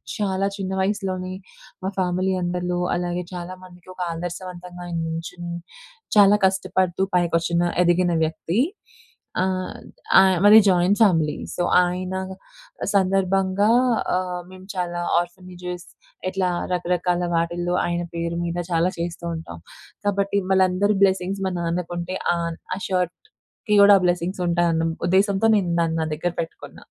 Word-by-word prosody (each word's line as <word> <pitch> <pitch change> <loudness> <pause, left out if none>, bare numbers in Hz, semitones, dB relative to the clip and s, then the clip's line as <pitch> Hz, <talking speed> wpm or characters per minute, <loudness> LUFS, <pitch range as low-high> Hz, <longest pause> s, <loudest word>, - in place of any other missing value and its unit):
చాలా 195 -3 0
చిన్న 190 -1 -4
వయసులోనే 190 -2 -2 0.5
మా 190 - 0
ఫ్యామిలీ 185 +1 0
అందరిలో, 180 0 -1 0.2
అలాగే 175 0 -2
చాలా 180 +1 -6
మందికొక 185 0 -12
ఆదర్శవంతంగా 175 +1 -7
ఆయన 170 - -3
నుంచుని, 170 +1 -5 0.6
చాలా 205 0 +7
కష్టపడుతూ 190 -1 +1
పైకొచ్చిన 170 0 +1 0.2
ఎదిగిన 175 0 +3
వ్యక్తి. 165 +5 -1 0.8
ఆహ్, 185 -1 -2 0.5
ఆహ్, 190 -2 +4
మాది 215 +2 +10
జాయింట్ 185 +3 +3
ఫ్యామిలీ. 165 -7 +2 0.2
సో, 175 - 0 0.2
ఆయన 180 +1 -3 0.8
సందర్భంగా 195 +2 +2 0.5
ఆహ్, 180 -1 -3
మేము 185 0 -12
చాలా 175 -1 -2 0.2
ఆర్ఫనేజె‌స్ 180 0 -8 0.4
ఇట్లా 185 -1 0 0.2
రకరకాల 180 0 0
వాటిలో 175 +1 0
ఆయన 175 0 -1
పేరు 170 0 -2
మీద 170 0 -3
చాలా 170 +2 +2
చేస్తూ 170 0 -4
ఉంటాం. 85 - -8 0.5
కాబట్టి 200 0 +1
వాళ్ళందరి 190 +2 +3
బ్లెస్సింగ్స్ 190 0 +1
మా - - -1
నాన్నకుంటే 175 +1 -3 0.2
ఆహ్, 170 -1 -3 0.2
ఆ - - -7
షర్ట్‌కి 190 - -3
కూడా 200 0 +8
బ్లెస్సింగ్స్ 180 +1 0
ఉంటాయన్న 170 -1 +1 0.2
ఉద్దేశంతో 195 +4 +3
నేను 180 -4 0
దాన్ని 165 -1 0
నా 160 - -1
దగ్గర 175 +2 -2
పెట్టుకున్నా. 165 - -9
180 Hz, 125 wpm, -23 LUFS, 175-190 Hz, 0.8 s, మాది